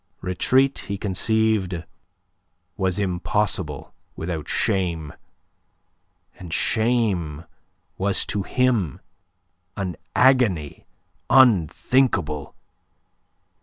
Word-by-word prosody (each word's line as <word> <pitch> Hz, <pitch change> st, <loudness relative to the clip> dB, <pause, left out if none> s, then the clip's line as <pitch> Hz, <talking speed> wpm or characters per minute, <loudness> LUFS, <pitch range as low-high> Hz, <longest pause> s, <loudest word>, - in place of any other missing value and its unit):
Retreat, 130 Hz, +9 st, +2 dB
he 100 Hz, 0 st, -3 dB
conceived, 100 Hz, -2 st, 0 dB, 0.9 s
was 95 Hz, -2 st, -1 dB
impossible 95 Hz, -3 st, -1 dB, 0.2 s
without 80 Hz, -2 st, -4 dB
shame; 85 Hz, -6 st, -1 dB, 1.3 s
and 90 Hz, -2 st, -9 dB
shame 100 Hz, -9 st, 0 dB, 0.5 s
was 100 Hz, +1 st, 0 dB
to 105 Hz, -, -2 dB
him 115 Hz, -, 0 dB, 0.8 s
an 95 Hz, -4 st, -3 dB, 0.2 s
agony 120 Hz, -, +2 dB, 0.4 s
unthinkable. 100 Hz, -, +3 dB
95 Hz, 65 wpm, -23 LUFS, 85-110 Hz, 1.3 s, unthinkable